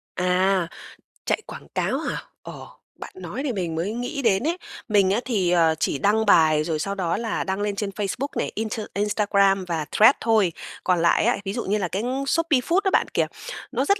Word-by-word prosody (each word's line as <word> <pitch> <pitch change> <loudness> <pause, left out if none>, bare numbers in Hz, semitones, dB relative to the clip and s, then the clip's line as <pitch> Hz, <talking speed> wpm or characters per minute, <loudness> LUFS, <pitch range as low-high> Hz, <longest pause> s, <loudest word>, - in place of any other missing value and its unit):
À, 180 0 +2 0.6
chạy - - 0
quảng - - -10
cáo - - 0
hả? - - -4 0.2
Ờ, - - -9 0.3
bạn - - -8
nói 320 -7 -6
thì 265 - -1
mình 175 -5 -3
mới 180 +7 -2
nghĩ 250 +4 -4
đến 210 -4 +2
ấy. 340 +2 0 0.3
Mình 200 -3 +3
á 210 - +2
thì, 195 -8 +1
ờ, 165 -2 +4
chỉ - - 0
đăng 215 +6 +2
bài 155 -6 +5
rồi 155 -1 -2
sau 195 +5 -2
đó 175 -2 -1
là 225 -2 -2
đăng 190 +1 -2
lên 205 -1 -1
trên 200 0 -2
Facebook 205 +7 -3
này, - - -1
inter 220 0 -3
Instagram 200 -2 +2
và 160 -3 -2
Threads 220 +6 +6
thôi. 220 -6 +3 0.3
Còn 180 -2 +2
lại 170 +4 +3
á, 240 - +2
ví 195 - -2
dụ 235 - -3
như 205 +2 +1
là 190 -4 -1
cái 195 +5 -3 0.2
Shopee 325 -2 +2
Food 335 +9 +1
đó 385 - +1
bạn - - +3
kìa, - - +1 0.4
nó - - 0
rất 400 0 +2
200 Hz, 215 wpm, -24 LUFS, 180-225 Hz, 0.6 s, Threads